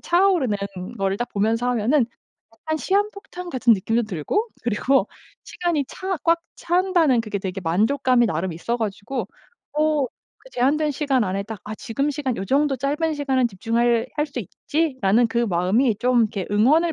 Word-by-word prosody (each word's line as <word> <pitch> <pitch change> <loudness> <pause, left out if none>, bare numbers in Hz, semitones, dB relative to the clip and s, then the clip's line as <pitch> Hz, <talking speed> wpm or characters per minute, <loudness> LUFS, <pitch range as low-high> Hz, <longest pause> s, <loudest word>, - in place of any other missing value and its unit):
차오르는 345 - +2 0.4
거를 195 0 0
딱 240 +3 -3
보면서 225 +4 +1
하면은 245 +3 +2 0.5
약간 315 +8 -4
시한폭탄 395 -1 -2
같은 245 -4 +4
느낌도 225 +5 0
들고 215 - -1 0.2
그리고 240 +1 +2 0.4
시간이 340 -5 -1
차 380 0 -3
꽉 335 0 +3 0.2
찬다는 345 -8 +2
그게 210 -3 -3
되게 190 0 -4
만족감이 240 +8 +2
나름 175 0 -2
있어 235 +9 -2
가지고 215 +3 -3 0.5
어 305 -3 +2 0.3
그 - - -17
제한된 295 - +1
시간 270 -5 +1
안에 195 +1 -2
딱 215 +1 -7
'아 215 - -5
지금 275 +7 -2
시간 270 -4 -2
요정도 270 +7 +1
짧은 295 +5 0
시간은 265 -4 +1
집중할 230 +4 +1
할 295 - +2
수 275 -3 -7
있지.'라는 245 - +1
그 235 +1 -2
마음이 210 +3 +2
좀 245 0 +3
이렇게 210 -4 -1
응원을 300 +11 +4
250 Hz, 335 characters per minute, -23 LUFS, 215-300 Hz, 0.5 s, 같은